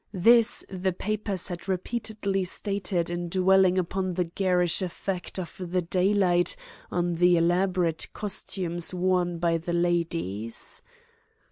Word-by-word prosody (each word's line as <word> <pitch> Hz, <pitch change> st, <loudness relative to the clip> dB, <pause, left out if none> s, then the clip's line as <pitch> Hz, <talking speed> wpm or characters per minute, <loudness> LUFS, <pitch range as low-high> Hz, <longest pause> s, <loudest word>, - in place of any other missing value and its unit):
This 230 Hz, +4 st, +5 dB
the 185 Hz, -1 st, -2 dB
papers 200 Hz, -1 st, -2 dB
had 175 Hz, +2 st, -6 dB
repeatedly 200 Hz, 0 st, -1 dB
stated 185 Hz, -2 st, -1 dB
in 175 Hz, 0 st, -3 dB
dwelling 190 Hz, 0 st, +4 dB
upon 185 Hz, 0 st, -1 dB
the 180 Hz, -, +1 dB
garish 180 Hz, 0 st, +1 dB
effect 185 Hz, 0 st, -4 dB
of 180 Hz, -3 st, -5 dB
the 180 Hz, 0 st, -1 dB
daylight 180 Hz, 0 st, +2 dB, 0.3 s
on 175 Hz, 0 st, 0 dB
the 175 Hz, 0 st, +5 dB
elaborate 175 Hz, -1 st, +1 dB
costumes 180 Hz, -4 st, -2 dB
worn 180 Hz, -1 st, +1 dB
by 165 Hz, 0 st, +1 dB
the 170 Hz, +1 st, -4 dB
ladies. 165 Hz, -, -1 dB
180 Hz, 120 wpm, -27 LUFS, 175-190 Hz, 0.3 s, This